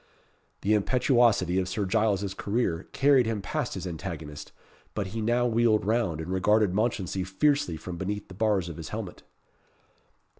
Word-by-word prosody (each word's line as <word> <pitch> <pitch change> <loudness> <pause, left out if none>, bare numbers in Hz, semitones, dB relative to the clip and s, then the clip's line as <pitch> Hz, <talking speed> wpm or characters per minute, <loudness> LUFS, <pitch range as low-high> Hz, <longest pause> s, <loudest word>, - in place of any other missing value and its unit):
The 105 - +2
impetuosity 110 - +3
of 95 -1 -2
Sir 100 +2 -1
Giles's 100 -1 +1
career 100 -4 -1
carried 135 -4 +4
him 115 -2 -1
past - - -3
his - - -5
antagonist, 80 -4 -6 0.4
but 105 - -1
he 115 - -2
now 120 +3 +2
wheeled 115 -3 +2
round, 105 -7 0
and 80 +3 -5
regarded 105 +1 +3
Mounchensey 100 -3 -1
fiercely 95 - +1
from 90 +1 -7
beneath 100 +3 -4
the - - -11
bars 100 -2 +1
of 85 -2 -7
his 80 - -7
helmet. 105 -5 -6
100 Hz, 155 wpm, -27 LUFS, 90-115 Hz, 0.4 s, carried